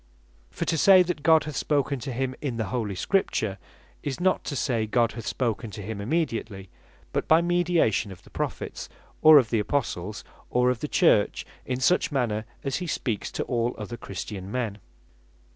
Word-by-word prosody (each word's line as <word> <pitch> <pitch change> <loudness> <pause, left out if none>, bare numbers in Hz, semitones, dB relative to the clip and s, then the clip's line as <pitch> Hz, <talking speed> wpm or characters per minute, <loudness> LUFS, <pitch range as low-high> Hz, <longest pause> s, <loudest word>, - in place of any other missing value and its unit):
For - - -4
to 165 - 0
say 190 +1 +7
that 180 -4 -3
God 160 0 +5
hath 150 -2 -6
spoken 140 -1 0
to 125 +3 -5
him 130 +1 -2
in 130 -6 -3
the 110 -5 -2
Holy 110 -6 -2
Scripture, 100 - 0 0.4
is 140 -3 -4
not 185 +1 +2
to 145 - -3
say 115 -5 0
God 115 +1 +2
hath 115 - -8
spoken 115 -2 -2
to 105 +1 -8
him 105 0 -5
immediately, 110 - -2 0.4
but - - -1
by 160 - +6
mediation 175 - +2
of 95 - -12
the - - -18
Prophets, - - -4 0.3
or 155 -1 +9
of 125 -5 +3
the 115 - +2
Apostles, 105 -4 -2 0.3
or 125 +1 +3
of 125 - -3
the - - -3
Church, - - +3 0.2
in 125 -1 -1
such 175 +5 +2
manner 115 -6 -1 0.2
as 135 -2 -1
he 180 - -4
speaks 115 -8 -2
to - - -2
all 120 -1 -1
other 110 +2 -6
Christian 95 -2 -7
men. 115 -4 -2
125 Hz, 185 wpm, -26 LUFS, 110-150 Hz, 0.4 s, or